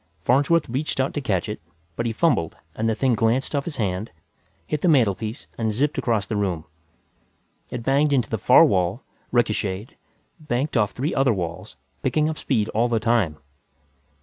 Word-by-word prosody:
Farnsworth 145 - +3
reached 135 +4 -3
out 130 - +1
to 145 - -2
catch 95 -9 -1
it, 105 -4 -5 0.3
but 115 - -1
he - - 0
fumbled 115 - +1 0.2
and 110 +1 0
the 110 - +1
thing 130 +1 +2
glanced 115 +6 +1
off 140 - -1
his 165 - -5
hand, 100 -2 -2 0.6
hit 150 -1 -2
the - - +2
mantelpiece 115 - +1
and 110 -1 0
zipped 140 +7 0
across 110 -5 0
the 110 - -3
room. 90 -6 -1 1.0
It 120 -2 -5
banged 140 +4 +2
into 125 -6 +2
the - - -1
far - - +7
wall, 95 +5 0 0.3
richocheted, 105 - 0 0.5
banked 145 -1 -2
off 105 -4 +2
three 140 +6 -2
other 135 -4 +2
walls, 85 -3 -5 0.3
picking 155 0 +1
up 155 - -5
speed 110 -6 0
all 115 +3 +1
the 115 -2 +1
time. 110 -9 +1
115 Hz, 175 wpm, -23 LUFS, 105-135 Hz, 1.0 s, far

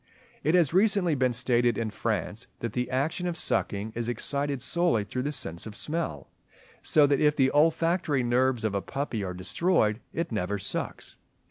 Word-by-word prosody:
It 155 +5 +3
has 165 -5 +3
recently 195 -3 +3
been 130 -3 +2
stated 120 -1 +1
in 115 -2 -2
France, 105 0 -3
that 115 -2 -4
the 125 -1 -2
action 155 +7 -1
of 175 -1 -2
sucking 110 - -1
is 120 +1 -3
excited 140 +3 -2
solely 165 -3 +1
through 125 +5 -4
the 145 +3 -2
sense 85 - -4
of 105 - -8
smell, 150 - -4 0.5
so 150 -2 +4
that 140 -1 +2
if 150 -1 +4
the 135 -2 +3
olfactory 165 -1 +2
nerves 125 0 +1
of 110 -2 0
a 100 - 0
puppy 135 -5 -3
are 90 -1 -4
destroyed, 110 - +1
it 165 -3 -3
never 105 -2 -1
sucks. 95 - -4
130 Hz, 175 wpm, -27 LUFS, 110-155 Hz, 0.5 s, so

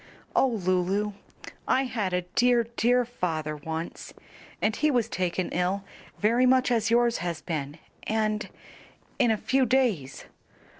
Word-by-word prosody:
"O - - +5
Lulu, 195 -1 0 0.5
I 265 - +3
had 220 -7 -2
a 180 0 0
dear, 240 +6 +3
dear 245 +1 +3
father 160 -10 -3
once, 160 +3 -6 0.4
and 215 +1 +1
he 305 - +2
was 245 -6 +1
taken 180 0 -2
ill 185 +3 0 0.3
very 235 +4 +3
much 255 0 +3
as 225 -3 +2
yours 235 0 +3
has 170 -2 -3
been 150 -3 -4 0.3
and 215 0 0 0.7
in 240 - +4
a 220 - +2
few 265 +5 +1
days. 230 - 0
210 Hz, 140 wpm, -27 LUFS, 180-245 Hz, 0.7 s, O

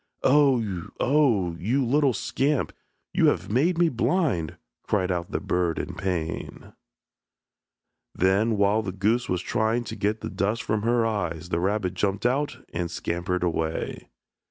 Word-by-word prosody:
"Oh, 125 - +3
oh, 120 - +3
you 125 +8 +1
little 140 +1 +3
scamp, 140 +6 0 0.4
you - - +4
have - - 0
made 160 +10 +2
me 175 0 +4
blind," 130 - 0 0.2
cried 95 -3 0
out 85 -1 -2
the - - -2
bird 90 -2 0
in - - -4
pain. 85 -4 -4 1.4
Then 100 +5 +2
while 100 +2 +3
the 100 -3 -4
goose 105 +6 0
was 90 -1 -1
trying 115 +1 0
to 110 -1 -6
get 105 +1 -1
the - - -4
dust 105 +5 -1
from 110 -1 0
her 115 +1 +2
eyes 85 -7 -2
the 85 - 0
rabbit 95 0 0
jumped 100 +3 -1
out 140 +4 0
and 85 0 -2
scampered 90 +1 -2
away. 80 -2 -2
105 Hz, 150 wpm, -25 LUFS, 90-120 Hz, 1.4 s, you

